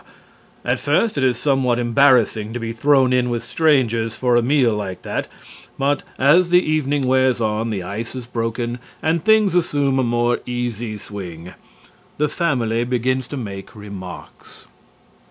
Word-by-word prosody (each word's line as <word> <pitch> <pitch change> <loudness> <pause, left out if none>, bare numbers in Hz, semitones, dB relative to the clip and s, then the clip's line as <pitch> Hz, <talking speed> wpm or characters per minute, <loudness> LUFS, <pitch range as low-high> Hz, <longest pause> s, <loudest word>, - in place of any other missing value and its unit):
At - - 0
first 230 -2 +1
it 140 - 0
is 125 -2 +2
somewhat 135 -4 +1
embarrassing 120 -3 +3
to 120 - -3
be 115 0 -4
thrown 130 +1 +3
in 125 -1 +2
with 120 -1 -2
strangers 115 -8 +1
for 125 -2 +1
a 120 - +4
meal 125 -2 +2
like 100 -3 -5
that, - - -3 0.5
but, 140 +1 +1 0.2
as 170 +7 +4
the 175 - +6
evening 145 -4 0
wears 130 -1 +2
on, 110 0 -1
the 100 -4 -3
ice 110 +7 -6
is 125 -2 -6
broken 120 0 -3 0.2
and 160 0 +1
things 220 -3 +4
assume 145 -6 +1
a - - +2
more 120 0 +1
easy 120 -3 -3
swing. 90 -4 -9 0.6
The 150 0 +1
Family 120 -10 0
begins 125 +1 -1
to 145 - -6
make 100 -2 -7
remarks. 100 -3 -10
120 Hz, 155 wpm, -20 LUFS, 115-140 Hz, 0.6 s, the